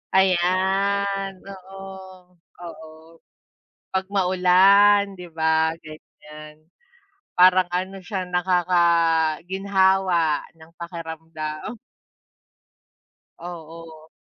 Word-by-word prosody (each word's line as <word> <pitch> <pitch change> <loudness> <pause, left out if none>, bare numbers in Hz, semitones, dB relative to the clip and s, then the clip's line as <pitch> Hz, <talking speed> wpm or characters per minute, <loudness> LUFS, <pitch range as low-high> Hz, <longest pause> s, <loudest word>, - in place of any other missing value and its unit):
Ayan, 195 +1 +1
oo, 190 -1 -12 0.2
oo, 160 -2 -10 1.0
pag 190 0 -1
maulan, 195 +2 +4
'di 180 - -9
ba, 160 0 +1
ganyan. 155 0 -14 0.8
Parang 185 0 +5
ano, 185 +2 -4
siya 190 0 -5
nakakaginhawa 180 0 +1 0.2
ng 160 +1 -18
pakiramdam. 160 +1 -7 1.6
Oo. 165 -2 -11
180 Hz, 65 wpm, -22 LUFS, 160-190 Hz, 1.6 s, Parang